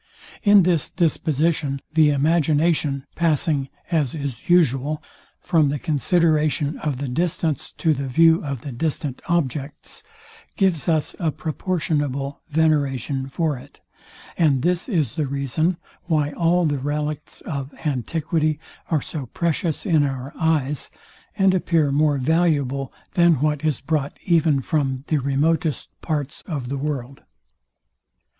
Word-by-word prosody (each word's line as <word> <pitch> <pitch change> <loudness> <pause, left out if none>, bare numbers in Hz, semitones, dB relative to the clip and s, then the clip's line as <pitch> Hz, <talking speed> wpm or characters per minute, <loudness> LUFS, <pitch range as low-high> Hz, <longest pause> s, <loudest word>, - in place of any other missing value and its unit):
In 205 -2 +6
this 170 -5 +1
disposition, 155 -3 0
the 155 -1 +5
imagination, 150 -1 +2
passing, 150 -4 +1 0.2
as 155 -5 +1
is 140 -4 -6
usual, 150 -3 +2 0.4
from 160 -5 +2
the 145 - -1
consideration 155 0 +1
of 150 -4 -2
the 140 +1 -3
distance 160 +1 -1
to 160 -3 +1
the 140 -1 -3
view 165 +5 +4
of 140 -5 -4
the 140 - -6
distant 140 +1 -2
objects, 150 - -2 0.6
gives 180 -6 +1
us 155 -2 +1
a 165 - +1
proportionable 145 -4 -2
veneration 140 -4 +1
for 150 -2 -1
it; - - -16 0.6
and 140 -6 +3
this 180 +5 +1
is 155 - 0
the 150 -2 -1
reason 140 +6 0 0.3
why 150 -4 +1
all 175 +2 +2
the 145 -3 0
relicts 150 +2 -3
of 140 -2 -5
antiquity 155 - 0 0.3
are 155 -5 +1
so 145 -6 -5
precious 170 - -1
in 160 -7 +3
our 135 0 -3
eyes, 150 -3 0 0.5
and 195 -2 +4
appear 165 -5 +2
more 145 0 +2
valuable 140 -2 +1 0.2
than 170 -1 +5
what 150 +1 0
is 155 -2 0
brought 145 -1 -2
even 160 -5 +3
from 135 -2 -1
the 155 - +2
remotest 145 +3 0
parts 145 -3 -3
of 140 -7 -4
the 140 - -2
world. 140 -2 -4
150 Hz, 130 wpm, -22 LUFS, 140-165 Hz, 0.6 s, In